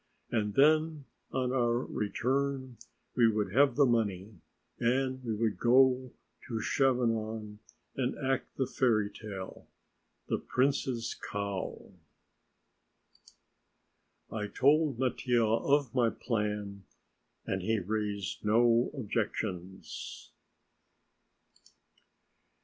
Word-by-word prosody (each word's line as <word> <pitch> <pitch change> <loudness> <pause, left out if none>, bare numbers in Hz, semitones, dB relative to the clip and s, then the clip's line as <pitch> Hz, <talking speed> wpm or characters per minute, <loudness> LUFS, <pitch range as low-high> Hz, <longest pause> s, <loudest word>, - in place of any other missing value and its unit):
And 105 -3 0
then 155 0 +3 0.3
on 130 -1 0
our 120 -2 +2
return 130 +3 -2 0.4
we 120 -2 +5
would 105 -1 -2
have 135 -1 +4
the 145 - +5
money 110 -4 0 0.5
and 130 +2 0
we 115 -3 -2
would 110 -1 -1
go 130 +1 +4 0.4
to 115 -3 -3
Chavanon 110 -4 0 0.4
and 130 -1 -1
act 135 -2 -1
the 130 - +1
fairy 110 -6 +1
tale, 100 -3 -8 0.6
"The - - 0
Prince's 130 -3 0
Cow." 100 -1 -5 2.4
I 105 -2 -3
told 145 +3 +3
Mattia 125 -2 +1
of 130 +3 +2
my 120 -3 +3
plan 105 -4 -3 0.6
and 95 - -2
he 110 +4 +1
raised 105 0 -3
no 115 +3 +4
objections. 100 -6 -4
120 Hz, 95 wpm, -31 LUFS, 105-130 Hz, 2.4 s, we